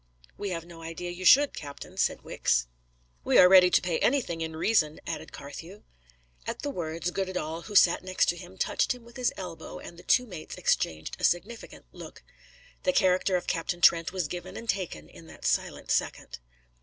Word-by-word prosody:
"We 205 Hz, -, -4 dB
have 165 Hz, -2 st, -4 dB
no 170 Hz, -1 st, -12 dB
idea 165 Hz, +2 st, -6 dB
you 180 Hz, +1 st, -7 dB
should, 285 Hz, +6 st, +7 dB
captain," 145 Hz, -2 st, -9 dB
said -, -, 0 dB
Wicks. -, -, 0 dB, 0.6 s
"We -, -, +3 dB
are 180 Hz, -, +9 dB
ready 185 Hz, -1 st, +8 dB
to -, -, +4 dB
pay 175 Hz, -2 st, -1 dB
anything 230 Hz, -11 st, 0 dB
in 160 Hz, 0 st, -4 dB
reason," 160 Hz, -3 st, +1 dB
added -, -, -5 dB
Carthew. 165 Hz, +8 st, -10 dB, 0.6 s
At -, -, -5 dB
the 290 Hz, -, -2 dB
words, 165 Hz, -, -3 dB
Goddedaal, 180 Hz, -4 st, -3 dB
who 210 Hz, -, -8 dB
sat 175 Hz, -2 st, +5 dB
next 185 Hz, 0 st, +1 dB
to 175 Hz, -, +1 dB
him, 180 Hz, +2 st, -12 dB
touched 250 Hz, -, 0 dB
him 245 Hz, -, -15 dB
with 235 Hz, -, -16 dB
his 250 Hz, -2 st, 0 dB
elbow, 180 Hz, -4 st, -7 dB
and 170 Hz, -, -11 dB
the -, -, -13 dB
two 250 Hz, -, +3 dB
mates 180 Hz, -9 st, -8 dB
exchanged 80 Hz, 0 st, -1 dB
a -, -, -9 dB
significant 210 Hz, +7 st, -1 dB
look. -, -, -11 dB, 0.6 s
The 275 Hz, -, +1 dB
character 185 Hz, -4 st, +3 dB
of 180 Hz, -, -1 dB
Captain 175 Hz, +1 st, -2 dB
Trent 165 Hz, -2 st, +5 dB
was 185 Hz, -4 st, -2 dB
given 175 Hz, +3 st, -7 dB
and 230 Hz, -, -8 dB
taken 170 Hz, -, -3 dB
in -, -, -15 dB
that -, -, -12 dB
silent -, -, -1 dB
second. -, -, -2 dB
175 Hz, 195 wpm, -28 LUFS, 165-195 Hz, 0.6 s, are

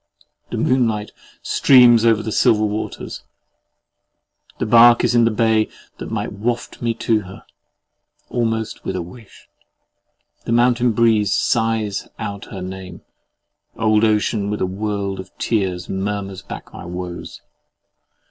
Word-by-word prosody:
The -, -, -4 dB
moonlight 115 Hz, -5 st, +1 dB, 0.3 s
streams 120 Hz, -4 st, +5 dB
over 110 Hz, -2 st, +3 dB
the 110 Hz, -, -4 dB
silver 110 Hz, 0 st, +3 dB
waters: 105 Hz, +1 st, -5 dB, 1.4 s
the -, -, -2 dB
bark 120 Hz, +1 st, +6 dB
is 120 Hz, -1 st, +2 dB
in 120 Hz, -1 st, +4 dB
the -, -, +3 dB
bay 110 Hz, 0 st, +2 dB, 0.3 s
that -, -, -6 dB
might -, -, -3 dB
waft 115 Hz, +4 st, -3 dB
me 115 Hz, -1 st, -1 dB
to 115 Hz, -1 st, +1 dB
her, 95 Hz, -2 st, -11 dB, 0.8 s
almost 115 Hz, -2 st, -2 dB
with 95 Hz, -, -3 dB
a 90 Hz, -, -2 dB
wish. 100 Hz, +5 st, -15 dB, 1.0 s
The 115 Hz, -, -1 dB
mountain 120 Hz, 0 st, +3 dB
breeze 110 Hz, -3 st, +3 dB
sighs 110 Hz, -3 st, 0 dB
out 100 Hz, -2 st, -6 dB
her 95 Hz, -2 st, -8 dB
name: 95 Hz, -1 st, -8 dB, 0.7 s
old 110 Hz, -1 st, +2 dB
ocean 105 Hz, -1 st, +1 dB
with 105 Hz, -, -2 dB
a -, -, +2 dB
world 100 Hz, 0 st, -3 dB
of 95 Hz, 0 st, -8 dB
tears 95 Hz, -5 st, -1 dB
murmurs 95 Hz, -1 st, -4 dB
back 100 Hz, -, -10 dB
my -, -, -9 dB
woes! 90 Hz, 0 st, -7 dB
110 Hz, 135 wpm, -20 LUFS, 100-115 Hz, 1.4 s, bark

